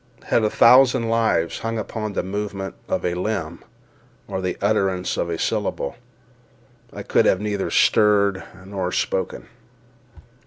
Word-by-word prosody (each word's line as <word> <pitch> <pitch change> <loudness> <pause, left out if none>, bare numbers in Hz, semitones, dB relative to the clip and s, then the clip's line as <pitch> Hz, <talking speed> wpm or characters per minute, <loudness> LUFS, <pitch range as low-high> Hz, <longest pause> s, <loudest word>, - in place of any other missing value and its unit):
Had 115 - +1
a 105 - +2
thousand 125 +1 +5
lives 115 -7 +1
hung 115 0 -3
upon 110 -1 -4
the - - -1
movement 100 0 -4 0.2
of - - -1
a 90 - 0
limb 90 -3 -3 0.6
or 95 - -4
the 90 -1 -3
utterance 95 -3 0
of 85 - -2
a 85 - -2
syllable, 70 - -2 1.0
I - - -8
could - - +2
have 95 - +3
neither 105 -2 -2
stirred 100 -2 +3 0.2
nor 95 -2 -3
spoken. - - -2
100 Hz, 140 wpm, -22 LUFS, 95-110 Hz, 1.0 s, thousand